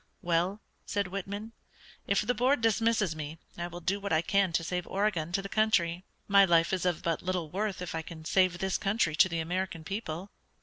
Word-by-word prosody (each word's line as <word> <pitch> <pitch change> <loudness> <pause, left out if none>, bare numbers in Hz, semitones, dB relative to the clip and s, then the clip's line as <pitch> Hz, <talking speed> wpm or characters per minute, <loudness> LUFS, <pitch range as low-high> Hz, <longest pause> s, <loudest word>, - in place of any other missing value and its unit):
"Well," 175 +5 +1 0.3
said 200 -3 -1
Whitman, 200 +3 -5 0.6
"if 200 - +3
the 240 +4 +1
Board 255 +3 +2
dismisses 225 -5 +2
me, 155 +1 -6 0.2
I 175 0 -3
will 175 0 -8
do 190 +4 0
what 200 0 -4
I 160 0 +3
can 200 -2 +2
to 165 - +1
save 180 +1 -3
Oregon 190 -5 0
to 195 +1 0
the - - -4
country. 185 -5 +1 0.2
My 200 -1 +7
life 170 -1 +4
is 185 -1 +1
of 175 -3 -1
but 165 -1 0
little 180 -4 -2
worth 200 -1 -2
if 180 - -5
I 165 - -2
can 160 -1 -10
save 185 0 +3
this 190 +1 -1
country 195 -6 +1
to 185 - +5
the 170 - -2
American 175 0 -2
people." 195 -1 -5
185 Hz, 210 wpm, -30 LUFS, 170-200 Hz, 0.6 s, My